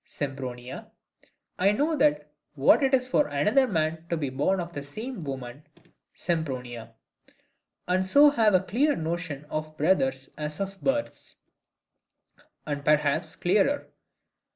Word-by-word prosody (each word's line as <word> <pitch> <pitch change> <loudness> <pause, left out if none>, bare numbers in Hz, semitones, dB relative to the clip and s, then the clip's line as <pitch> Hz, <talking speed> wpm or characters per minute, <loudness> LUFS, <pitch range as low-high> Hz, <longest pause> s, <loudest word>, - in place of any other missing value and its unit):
Sempronia, 130 -3 -6 0.7
I 195 +3 +4
know 300 +8 +1 0.6
what 140 - +5
it 270 -1 +2
is 255 -1 -1
for 285 +3 +2
another 215 - +2
man 160 -4 -1
to 170 - 0
be 145 -4 -3
born 145 +9 +1
of 170 -1 -5
the 145 - -4
same 215 - -6
woman 135 -1 -6 0.5
Sempronia; 125 -9 -3 0.9
and 185 +1 +1
so 285 +8 +7
have 220 -7 +3
as 185 - +3
clear 290 +7 +2
a - - -5
notion 160 -3 -4
of 155 +1 -5
brothers 135 -5 +1
as 150 0 -5
of 195 0 -5
births, 290 +1 -3 1.2
and 145 -1 -4
perhaps 150 +2 +1
clearer. 210 +11 +1
160 Hz, 130 wpm, -27 LUFS, 140-210 Hz, 1.2 s, so